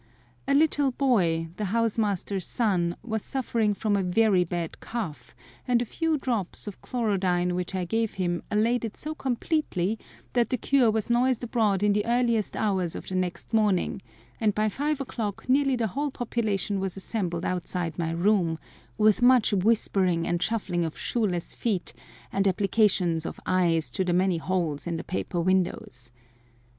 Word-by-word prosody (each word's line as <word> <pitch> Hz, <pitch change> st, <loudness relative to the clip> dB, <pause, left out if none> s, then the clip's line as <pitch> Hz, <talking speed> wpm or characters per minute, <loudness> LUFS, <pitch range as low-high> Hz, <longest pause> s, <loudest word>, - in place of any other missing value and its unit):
A 275 Hz, -, +3 dB
little 290 Hz, -2 st, +3 dB
boy, 175 Hz, -12 st, +1 dB
the 210 Hz, -, -2 dB
house 230 Hz, +3 st, 0 dB
master's 200 Hz, -3 st, -1 dB
son, 180 Hz, -7 st, +1 dB
was 220 Hz, -2 st, -3 dB
suffering 230 Hz, -5 st, 0 dB
from 210 Hz, 0 st, 0 dB
a 200 Hz, -, +2 dB
very 190 Hz, 0 st, +3 dB
bad 170 Hz, -1 st, -4 dB
cough, 215 Hz, -11 st, -6 dB, 0.3 s
and 245 Hz, -1 st, +3 dB
a 240 Hz, -, -1 dB
few 325 Hz, +6 st, 0 dB
drops 235 Hz, -9 st, -2 dB
of 205 Hz, -3 st, -8 dB
chlorodyne 185 Hz, -7 st, 0 dB
which 180 Hz, +1 st, -3 dB
I 185 Hz, -1 st, -1 dB
gave 225 Hz, +4 st, -1 dB
him 175 Hz, -2 st, -1 dB
allayed 230 Hz, +4 st, +1 dB
it 225 Hz, -2 st, -5 dB
so 310 Hz, +1 st, -4 dB
completely 240 Hz, -, -1 dB, 0.3 s
that 240 Hz, -2 st, +2 dB
the 255 Hz, -, 0 dB
cure 255 Hz, 0 st, +3 dB
was 220 Hz, +2 st, -1 dB
noised 245 Hz, 0 st, +2 dB
abroad 215 Hz, -5 st, +1 dB
in 205 Hz, -1 st, +4 dB
the 205 Hz, 0 st, +1 dB
earliest 235 Hz, -3 st, +1 dB
hours 190 Hz, -6 st, 0 dB
of -, -, -7 dB
the -, -, -5 dB
next 180 Hz, +3 st, -3 dB
morning, 205 Hz, -4 st, +2 dB, 0.4 s
and 210 Hz, -2 st, +1 dB
by 215 Hz, 0 st, +2 dB
five 290 Hz, +5 st, -1 dB
o'clock 220 Hz, -6 st, -4 dB
nearly 270 Hz, +1 st, +3 dB
the 235 Hz, -2 st, 0 dB
whole 290 Hz, +1 st, -1 dB
population 215 Hz, -6 st, -1 dB
was 190 Hz, -1 st, -3 dB
assembled 185 Hz, -4 st, -3 dB
outside 175 Hz, -2 st, -3 dB
my 165 Hz, -1 st, 0 dB
room, 170 Hz, -1 st, +2 dB, 0.4 s
with 215 Hz, +1 st, +4 dB
much 245 Hz, -3 st, +5 dB
whispering 190 Hz, -4 st, +2 dB
and 175 Hz, 0 st, -1 dB
shuffling 180 Hz, -4 st, 0 dB
of 160 Hz, -2 st, -4 dB
shoeless 195 Hz, -8 st, -1 dB
feet, 205 Hz, -7 st, -2 dB, 0.4 s
and 195 Hz, 0 st, +1 dB
applications 190 Hz, -4 st, +2 dB
of -, -, -6 dB
eyes 165 Hz, -7 st, +1 dB
to 165 Hz, +9 st, 0 dB
the 180 Hz, -1 st, 0 dB
many 180 Hz, 0 st, +2 dB
holes 165 Hz, -3 st, -2 dB
in 170 Hz, -1 st, -2 dB
the -, -, -5 dB
paper 180 Hz, -1 st, -3 dB
windows. 170 Hz, -9 st, -1 dB
205 Hz, 170 wpm, -27 LUFS, 180-230 Hz, 0.4 s, much